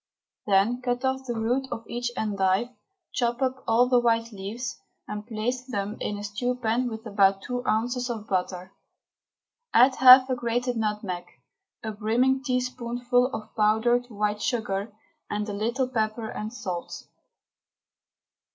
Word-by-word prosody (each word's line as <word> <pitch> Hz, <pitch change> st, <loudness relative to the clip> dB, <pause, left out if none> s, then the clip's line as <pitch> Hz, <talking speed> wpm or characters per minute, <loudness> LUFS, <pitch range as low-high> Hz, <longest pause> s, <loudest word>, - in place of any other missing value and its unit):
Then 205 Hz, +5 st, +3 dB
cut 245 Hz, +1 st, -1 dB
off 265 Hz, 0 st, -1 dB
the 240 Hz, -, -2 dB
root 245 Hz, +4 st, 0 dB
of 225 Hz, -, -5 dB
each 240 Hz, 0 st, -2 dB
endive, 200 Hz, +1 st, +1 dB, 0.4 s
chop 240 Hz, -1 st, 0 dB
up 260 Hz, -1 st, -1 dB
all 235 Hz, +2 st, +4 dB
the 250 Hz, -1 st, +4 dB
white 230 Hz, -1 st, +1 dB
leaves, 215 Hz, +5 st, -6 dB, 0.3 s
and 210 Hz, +1 st, -6 dB
place 240 Hz, +3 st, -2 dB
them 210 Hz, -5 st, -4 dB
in 205 Hz, -, -3 dB
a 205 Hz, -, -7 dB
stew 225 Hz, +5 st, -2 dB
pan 245 Hz, +1 st, 0 dB
with 220 Hz, 0 st, -7 dB
about 195 Hz, -2 st, +3 dB
two 245 Hz, 0 st, -3 dB
ounces 245 Hz, +3 st, 0 dB
of 220 Hz, -3 st, -4 dB
butter. 185 Hz, 0 st, -2 dB, 1.0 s
Add 260 Hz, +2 st, +6 dB
half 255 Hz, 0 st, +9 dB
a 260 Hz, -, 0 dB
grated 245 Hz, +1 st, -1 dB
nutmeg, 210 Hz, -5 st, -2 dB, 0.6 s
a 220 Hz, -, -3 dB
brimming 235 Hz, +5 st, +1 dB
teaspoonful 250 Hz, -1 st, 0 dB
of 220 Hz, -4 st, -7 dB
powdered 225 Hz, +3 st, +2 dB
white 210 Hz, -2 st, -2 dB
sugar, 210 Hz, -4 st, -1 dB, 0.4 s
and 210 Hz, 0 st, -2 dB
a 205 Hz, -, -4 dB
little 235 Hz, +6 st, 0 dB
pepper 220 Hz, -2 st, -2 dB
and 215 Hz, +1 st, -5 dB
salt. 185 Hz, -8 st, -5 dB
230 Hz, 145 wpm, -26 LUFS, 210-250 Hz, 1.0 s, half